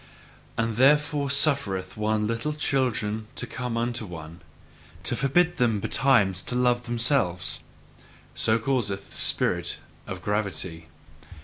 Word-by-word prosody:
And 115 -1 -1
therefore 145 +2 +3
suffereth 135 -11 +1
one 105 0 0
little 115 +7 -2
children 120 -7 -1
to - - -3
come 125 -2 -4
unto 120 0 -1
one, 85 -3 -9 0.6
to - - +2
forbid 175 +6 +2
them 115 -5 +2
betimes 105 -4 +3
to 125 - -5
love 125 -1 +2
themselves 115 -7 +1 0.7
so 110 - +2
causeth 115 -5 -2
the - - -9
spirit - - +2 0.3
of 95 -1 -6
gravity. 95 -6 -3
115 Hz, 120 wpm, -26 LUFS, 100-135 Hz, 0.7 s, therefore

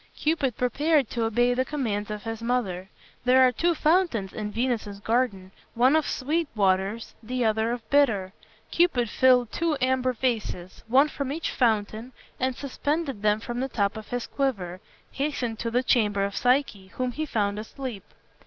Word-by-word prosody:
Cupid 300 -6 0
prepared 285 +2 +1
to 230 -2 -1
obey 240 +2 +2
the 255 +1 +1
commands 225 -8 -3
of 210 -1 -5
his 225 0 -5
mother. 205 -7 -2 0.3
There 255 +1 +6
are 255 - +4
two 340 +8 +1
fountains 305 - +1
in 210 -1 -4
Venus's 225 -4 -2
garden, 210 -4 -1 0.2
one 255 +5 +4
of 315 -2 +2
sweet 310 +5 -1
waters, 195 +2 0
the 245 +1 -2
other 220 +1 +1
of 240 -2 -5
bitter. 215 -10 +3 0.4
Cupid 270 -10 +2
filled 250 -3 +4
two 330 -3 0
amber 255 0 +1
vases, 220 -7 -3
one 265 +5 +5
from 280 -3 -4
each 320 +3 -3
fountain, 220 0 0 0.3
and 255 0 0
suspending 285 -2 -3
them 210 0 +2
from 240 +1 -4
the 265 +1 -2
top 200 -3 0
of 220 -1 -8
his 245 -1 -3
quiver, 195 -10 -2 0.3
hastened 260 -5 -2
to 230 - -2
the 245 +2 +1
chamber 210 -6 +2
of 200 - -5
Psyche, 250 -6 +1
whom 255 -1 -1
he 310 +5 -4
found 205 -4 -1
asleep. 220 -2 -6
245 Hz, 170 wpm, -26 LUFS, 210-265 Hz, 0.4 s, There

